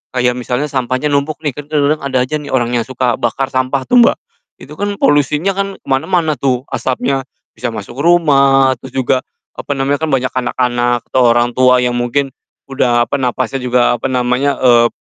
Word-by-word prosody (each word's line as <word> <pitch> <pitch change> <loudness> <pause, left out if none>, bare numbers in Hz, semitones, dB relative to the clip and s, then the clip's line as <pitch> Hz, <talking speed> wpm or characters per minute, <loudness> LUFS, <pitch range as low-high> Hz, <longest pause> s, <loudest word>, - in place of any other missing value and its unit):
kayak 125 0 +2
misalnya 125 +4 -3
sampahnya 130 +2 -1
numpuk 140 +2 0
nih, 145 - 0
kan 145 +1 -9
kadang-kadang 150 0 +1
ada 140 -2 -2
aja 140 +4 -3
nih 145 - -9
orang 120 -2 0
yang 115 -2 0
suka 130 -2 -1
bakar 130 +2 -2
sampah 130 +1 -1
tuh, 250 - +4
Mbak, 235 - +4 0.5
itu 145 - -11
kan 205 +6 -3
polusinya 145 +5 +2
kan 195 +1 -2
ke - - -40
mana-mana 155 +4 0
tuh 130 -2 0
asapnya, 135 +1 -2 0.3
bisa 120 +2 -4
masuk 115 +3 -8
rumah, 140 -5 +4
terus 130 -1 -11
juga, 130 0 +1 0.4
apa - - -6
namanya, 140 +1 0
kan 160 - -1
banyak 130 -1 0
anak-anak 120 -1 0
atau 130 - +3
orang 120 0 +2
tua 125 0 +4
yang 125 0 0
mungkin 135 +3 -1 0.4
udah, 120 -3 +2
apa, 140 +5 -2
napasnya 130 +2 -1
juga, 125 -1 +2
apa 120 - -2
namanya, 125 +2 0
eee, 120 -2 +4
130 Hz, 190 wpm, -15 LUFS, 125-145 Hz, 0.5 s, tuh